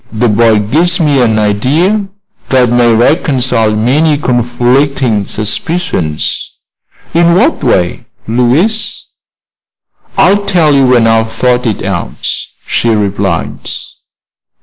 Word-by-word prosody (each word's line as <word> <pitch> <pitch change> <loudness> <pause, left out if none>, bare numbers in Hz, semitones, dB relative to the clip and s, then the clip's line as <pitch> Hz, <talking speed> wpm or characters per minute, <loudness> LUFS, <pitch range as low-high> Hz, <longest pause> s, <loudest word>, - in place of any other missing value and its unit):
The 115 +2 0
boy 110 +1 +3
gives 160 - 0
me 145 -5 +2
an 110 -3 +2
idea 145 - 0 0.4
that 125 -2 +3
may 120 -1 +3
reconcile 120 -3 +1
many 145 +8 +1
conflicting 125 -2 0
suspicions." 105 - -3 0.6
"In 170 +1 +3
what 245 - +1
way, 90 -1 0 0.2
Louise?" 145 - 0 1.1
"I'll 205 +2 +3
tell 165 -6 +2
you 135 -2 +3
when 120 -2 +3
I've 115 0 +1
thought 125 +1 0
it 110 - -2
out," 95 -4 -3 0.3
she 120 - -1
replied. 100 -5 -1
125 Hz, 105 wpm, -10 LUFS, 110-155 Hz, 1.1 s, boy